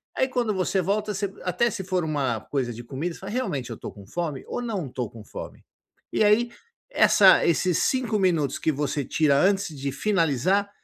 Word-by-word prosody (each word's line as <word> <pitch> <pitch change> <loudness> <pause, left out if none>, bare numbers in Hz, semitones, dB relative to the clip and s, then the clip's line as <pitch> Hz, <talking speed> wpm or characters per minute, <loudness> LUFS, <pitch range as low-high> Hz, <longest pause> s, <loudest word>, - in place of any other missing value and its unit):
aí 260 - +2
quando 245 -4 0
você 190 0 0
volta 210 +3 -1
você 195 0 -2
até 185 +7 +1
se 205 -5 -5
for 185 -1 -1
uma 140 -7 -1
coisa 130 -2 -2
de 120 +2 -9
comida, 145 +8 -4
fala 195 +2 -8
realmente 150 - -2
eu 115 - -5
estou - - -8
com 100 -2 -13
fome, 150 - -4
ou - - -3
não 210 - -3
estou 125 -3 -4
com 115 -2 -12
fome? - - -9 0.5
E - - +3
aí, 220 +3 +4 0.4
essa 195 - +6
esses 170 +1 +2
5 240 -5 +1
minutos 165 -7 +1
que 160 - +1
você 145 -1 -2
tira 145 -1 +2
antes 195 +3 +2
de 140 0 -3
finalizar, 185 - +1
180 Hz, 195 wpm, -25 LUFS, 140-205 Hz, 0.5 s, essa